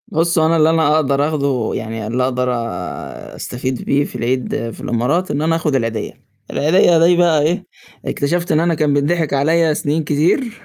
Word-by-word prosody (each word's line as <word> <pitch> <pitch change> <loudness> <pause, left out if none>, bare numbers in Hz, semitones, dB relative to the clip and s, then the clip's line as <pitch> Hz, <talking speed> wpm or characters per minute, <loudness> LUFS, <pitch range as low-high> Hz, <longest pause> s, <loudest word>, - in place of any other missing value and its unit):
بُص، 165 +1 +1
هو 160 - +3
أنا 165 +1 +2
اللي 155 0 +4
أنا 160 -2 +3
أقدر 145 -1 +1
آخده 140 -7 -1
يعني 110 -1 -5
اللي 125 +3 -1
أقدر 125 0 -1 0.9
أستفيد 130 +1 -4
بيه 140 +1 +1
في - - -10
العيد 120 -1 -2
في - - -12
الإمارات 140 +11 -1
إن 145 - -1
أنا 165 +1 +1
آخُد 155 -3 -1
العيديّة، 115 -4 -2 0.4
العيديّة 170 +2 +3
دي 175 +1 +5
بقى 170 -4 +3
إيه، 175 +6 0 0.4
اكتشفت 170 +5 -1
إن 155 - +3
أنا 170 +1 +1
كان 150 -2 +1
بيتضحك 150 +2 0
عليّا 160 +3 +2
سنين 150 +2 -1
كتير، 170 - 0
150 Hz, 180 wpm, -18 LUFS, 130-165 Hz, 0.9 s, دي